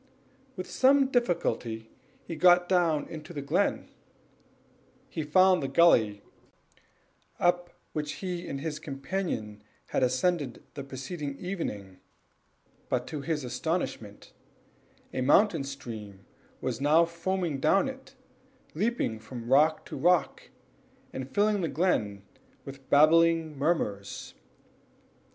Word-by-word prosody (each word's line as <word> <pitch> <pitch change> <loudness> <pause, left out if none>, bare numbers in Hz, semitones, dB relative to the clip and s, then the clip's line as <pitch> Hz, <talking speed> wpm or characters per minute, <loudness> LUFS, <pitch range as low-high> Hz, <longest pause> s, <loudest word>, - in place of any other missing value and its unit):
With 185 -1 -6
some 270 0 +4
difficulty 120 - -1 0.3
he 165 - -5
got 175 +2 +5
down 170 -5 +2
into 160 +1 -9
the 145 - -4
glen; 165 +8 0 1.2
he 160 - -3
found 185 +4 +4
the 135 - -2
gully 110 -12 +4 1.2
up 175 0 +2 0.2
which 150 -1 -3
he 180 -2 -5
and 140 - -4
his 155 -1 -4
companion 135 - -4 0.3
has - - 0
ascended 130 +2 0
the 140 - -6
preceding 140 +2 -6
evening; 105 - -5 0.9
but 125 -1 0
to 150 -3 -4
his 150 -1 -2
astonishment 125 - -4 0.8
a - - -2
mountain 160 +4 +4
stream 110 -8 -8 0.4
was - - -3
now 155 +4 +5
foaming 170 -2 -2
down 195 - +3
it, 265 0 -9 0.6
leaping 195 - -1
from 120 +2 -4
rock 155 +3 +4
to - - -7
rock, 175 0 +1 0.6
and 130 0 -5
filling 205 +4 +2
the 165 - 0
glen 130 - 0 0.4
with 135 -1 -11
babbling 165 +1 +4
murmurs. 135 - -2
155 Hz, 115 wpm, -28 LUFS, 130-180 Hz, 1.2 s, got